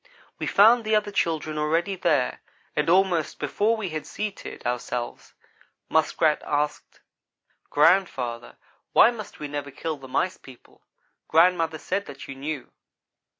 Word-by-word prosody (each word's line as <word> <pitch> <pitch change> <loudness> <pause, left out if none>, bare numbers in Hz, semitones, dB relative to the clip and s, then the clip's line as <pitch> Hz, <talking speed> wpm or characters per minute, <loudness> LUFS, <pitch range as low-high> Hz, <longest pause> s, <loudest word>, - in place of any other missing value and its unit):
We - - -3
found 225 +4 +6
the 215 0 +1
other 210 -1 +1
children 155 -5 -1
already 165 +6 0
there, 155 -8 0 0.3
and - - +1
almost 180 -3 +2
before 210 +10 0
we 205 -4 -3
had 155 -1 -5
seated 210 -9 -6
ourselves, 120 0 -4 0.5
Muskrat 160 -1 +2
asked: 150 0 -2 0.7
"Grandfather, 145 -8 +2 0.4
why 235 - +7
must 220 -4 -9
we 150 - -4
never 145 -1 -5
kill 155 +3 -4
the 135 -1 -11
Mice 180 +8 -1
people? 130 -2 -17 0.5
Grandmother 165 -1 +3
said 200 +5 -3
that 135 -1 -9
you - - -6
knew." 140 0 -5
160 Hz, 135 wpm, -25 LUFS, 145-195 Hz, 0.7 s, why